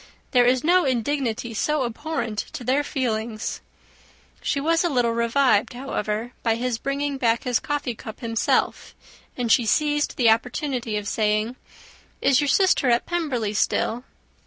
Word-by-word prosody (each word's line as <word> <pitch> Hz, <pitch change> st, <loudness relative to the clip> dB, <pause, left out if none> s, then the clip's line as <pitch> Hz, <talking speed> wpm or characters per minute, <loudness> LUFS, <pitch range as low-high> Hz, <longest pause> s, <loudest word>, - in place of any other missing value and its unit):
There 245 Hz, -1 st, +4 dB
is 255 Hz, 0 st, +2 dB
no 355 Hz, +3 st, +4 dB
indignity 245 Hz, -2 st, -1 dB
so 300 Hz, +5 st, 0 dB
abhorrent 240 Hz, -3 st, -3 dB
to -, -, -6 dB
their 265 Hz, +4 st, +1 dB
feelings." 225 Hz, -5 st, -3 dB, 0.8 s
She 280 Hz, -, -1 dB
was 330 Hz, +4 st, +2 dB
a 345 Hz, -, +1 dB
little 245 Hz, -5 st, +1 dB
revived, 235 Hz, -1 st, +2 dB
however, 240 Hz, -2 st, -3 dB
by 225 Hz, -1 st, +1 dB
his 240 Hz, 0 st, -2 dB
bringing 280 Hz, +1 st, -2 dB
back 230 Hz, -2 st, +1 dB
his 250 Hz, -2 st, +1 dB
coffee 290 Hz, -4 st, -2 dB
cup 220 Hz, -1 st, -10 dB
himself; 230 Hz, -2 st, 0 dB, 0.4 s
and 240 Hz, -3 st, 0 dB
she 235 Hz, -3 st, +4 dB
seized 295 Hz, +5 st, +1 dB
the 235 Hz, -3 st, +5 dB
opportunity 245 Hz, -1 st, -1 dB
of 205 Hz, 0 st, -4 dB
saying, 215 Hz, +2 st, 0 dB, 0.6 s
"Is 275 Hz, +1 st, +3 dB
your 290 Hz, -, 0 dB
sister 365 Hz, -5 st, +3 dB
at 235 Hz, 0 st, +2 dB
Pemberley 270 Hz, -12 st, -2 dB
still?" 230 Hz, +3 st, 0 dB
245 Hz, 150 wpm, -24 LUFS, 225-280 Hz, 0.8 s, the